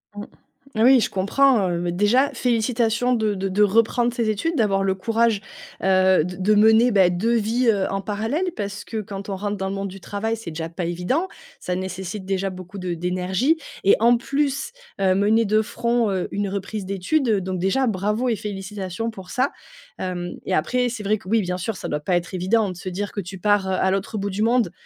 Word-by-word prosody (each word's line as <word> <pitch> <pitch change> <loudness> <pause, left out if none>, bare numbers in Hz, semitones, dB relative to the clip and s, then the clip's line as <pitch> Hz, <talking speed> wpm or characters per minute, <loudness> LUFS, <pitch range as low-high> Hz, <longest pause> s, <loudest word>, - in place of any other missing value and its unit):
Mmh, 205 0 -6 0.5
ah 220 - 0
oui, 260 +1 +7
je - - 0
comprends, 210 +2 +3
heu, 170 -1 -1
bah, 175 - -1
déjà 210 +10 +3
félicitations 235 0 +1
de 220 -3 +1
de 195 +1 -2
de 200 +3 0
reprendre 230 +4 +3
ses 235 -3 0
études, 330 +11 -2
d'avoir 200 -6 +2
le 190 -1 +1
courage, 225 +1 +1 0.4
heu, 185 -2 +4
de 180 +2 -5
de 200 +3 +2
mener, 220 +3 +6
beh, 190 -4 +4
2 225 +7 +1
vies, 230 +3 +1
heu, 200 -3 +2
en 195 0 -2
parallèle. 220 - -2
Parce 200 -2 -5
que 220 - -5
quand 200 -1 -7
on 195 - -2
rentre 205 +1 -3
dans 190 0 -3
le 195 - -3
monde 195 0 -3
du 195 +1 -10
travail, 220 +4 -3
c'est 220 -6 -7
déjà 160 +1 -5
pas 170 +1 -4
évident. 180 - -1 0.3
Ça 180 - -3
nécessite 190 +2 -5
déjà 195 0 -1
beaucoup 185 +1 -9
de 180 -1 -3
d'énergie 185 - 0 0.3
et 200 - +6
en 235 +1 +5
plus, 275 - -1 0.3
heu, 190 -1 +3
mener 215 +3 +3
de 215 +1 +3
front, 235 +1 0
heu, 185 -2 -1
une 205 0 -1
reprise 200 +1 -4
d'études, 200 +9 0
heu, 205 -3 +2
donc 185 0 -3
déjà 195 +9 +1
bravo 210 +3 0
et 230 - +1
félicitations 200 +1 -5
pour 190 -4 -11
ça! 260 +3 0 0.5
Hem, 175 -1 -3
et - - 0
après, 250 +10 +1
c'est 230 -3 -6
vrai 210 +1 +1
que - - -16
oui, 225 +1 +3
bien 180 -1 -2
sûr, 215 +4 -3
ça 170 - -6
doit 150 - -2
pas 180 +5 0
être 175 +1 -2
évident 195 +4 +1
de - - -8
se 185 +2 -6
dire, 200 +3 -4
que 205 - -4
tu 190 +1 -8
pars, 205 +1 +2
heu, 190 - 0
à 190 0 +1
l'autre 195 +3 -2
bout 200 0 -2
du 195 +3 -3
monde. 230 -4 +2
205 Hz, 225 wpm, -23 LUFS, 185-230 Hz, 0.5 s, oui